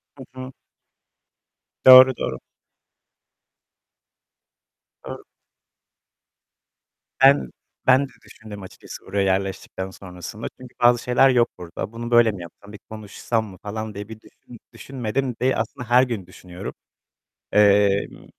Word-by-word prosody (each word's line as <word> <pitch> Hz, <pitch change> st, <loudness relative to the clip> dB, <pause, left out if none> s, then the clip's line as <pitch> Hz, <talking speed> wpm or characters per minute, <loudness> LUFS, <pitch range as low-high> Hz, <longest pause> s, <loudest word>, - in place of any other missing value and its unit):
Hı 135 Hz, -, -11 dB, 0.2 s
hı. 130 Hz, +1 st, -7 dB, 1.3 s
Doğru, 130 Hz, 0 st, +9 dB
doğru. -, -, -4 dB, 2.7 s
Doğru. -, -, -8 dB, 2.0 s
Ben, 140 Hz, +1 st, +5 dB, 0.4 s
ben 130 Hz, +2 st, +5 dB
de -, -, -21 dB
düşündüm 105 Hz, -3 st, -12 dB
açıkçası 95 Hz, -, -12 dB
oraya 100 Hz, +1 st, -1 dB
yerleştikten 95 Hz, 0 st, -3 dB
sonrasında, 95 Hz, +3 st, -9 dB
çünkü 130 Hz, -1 st, -13 dB
bazı 120 Hz, 0 st, +4 dB
şeyler 125 Hz, +2 st, +4 dB
yok 120 Hz, -2 st, +3 dB
burada. 90 Hz, +4 st, -7 dB
Bunu 120 Hz, +1 st, -7 dB
böyle 120 Hz, -2 st, +5 dB
mi 95 Hz, -3 st, -9 dB
yapsam? 95 Hz, +4 st, -13 dB
Bir 105 Hz, -, -11 dB
konuşsam 110 Hz, +1 st, -4 dB
mı 95 Hz, -3 st, -12 dB
falan 110 Hz, +2 st, -6 dB
diye 100 Hz, +1 st, -8 dB
bir 110 Hz, -1 st, -10 dB
düşün 120 Hz, -, -17 dB
düşünmedim 130 Hz, -1 st, -4 dB
de 130 Hz, +1 st, +2 dB
aslında 115 Hz, +2 st, -5 dB
her 125 Hz, +2 st, +5 dB
gün 115 Hz, -8 st, -4 dB
düşünüyorum. 90 Hz, 0 st, -10 dB, 0.8 s
Emm 100 Hz, -1 st, +2 dB
110 Hz, 115 wpm, -22 LUFS, 100-125 Hz, 2.7 s, Doğru